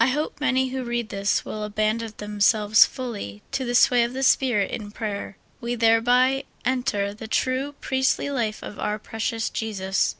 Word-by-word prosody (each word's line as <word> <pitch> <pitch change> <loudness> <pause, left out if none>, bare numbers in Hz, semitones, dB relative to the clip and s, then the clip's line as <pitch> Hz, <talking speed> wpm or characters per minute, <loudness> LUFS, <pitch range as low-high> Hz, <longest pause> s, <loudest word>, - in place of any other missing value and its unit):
FOOD. 230 - +5
hope 295 0 -3
many 260 -2 +2
who 260 0 -3
read 240 -2 -3
this 200 0 0
will 215 - -5
abandon 215 +2 -1
themselves 210 +1 +4
fully 205 - -6
to 265 - -1
the 245 -1 -2
sway 245 0 +5
of 235 +1 -2
the 265 +1 -3
Spirit 245 -6 +3
in 210 -2 -5
prayer; 205 -2 -5 0.2
we 235 +1 -3
thereby 245 +4 +3 0.2
en 255 0 +1
ter 200 -4 -1
the 220 +1 -9
true 260 +5 -1
priestly 265 +1 0
life 225 -5 -2
of 210 - -8
our 210 0 -1
precious 225 +1 -3
Jesus. 195 -4 -1
230 Hz, 175 wpm, -24 LUFS, 210-255 Hz, 0.2 s, FOOD